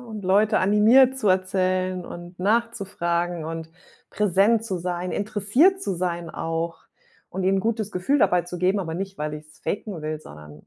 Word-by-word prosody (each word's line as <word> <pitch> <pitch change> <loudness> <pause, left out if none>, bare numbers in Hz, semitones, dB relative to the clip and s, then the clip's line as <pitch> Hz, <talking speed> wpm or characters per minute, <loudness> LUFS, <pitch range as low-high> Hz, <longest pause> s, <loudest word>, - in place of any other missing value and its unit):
und 220 -5 -8
Leute 205 +3 +3
animiert, 230 +7 +5
zu 210 - +1
erzählen 185 -1 0
und 175 +1 -10
nachzufragen 180 -6 -1
und 160 0 -6 0.4
präsent 210 +3 +2
zu 190 -5 -3
sein, 180 +1 -3
interessiert 215 - +2
zu 195 - -2
sein 175 -1 -3
auch 165 0 -3 0.5
und 190 +1 -4
ihnen 195 +1 +3
'n - - 0
gutes 220 -1 -2
Gefühl 230 +11 +1
dabei 180 -5 +3
zu 175 0 -7
geben. 190 +3 +2
Aber 160 -3 -4
nicht, 195 +1 -5
weil 150 0 -3
ich's 155 -1 -13
faken 200 -5 -4
will, 155 0 -3
sondern 75 - -13
185 Hz, 170 wpm, -24 LUFS, 170-210 Hz, 0.5 s, animiert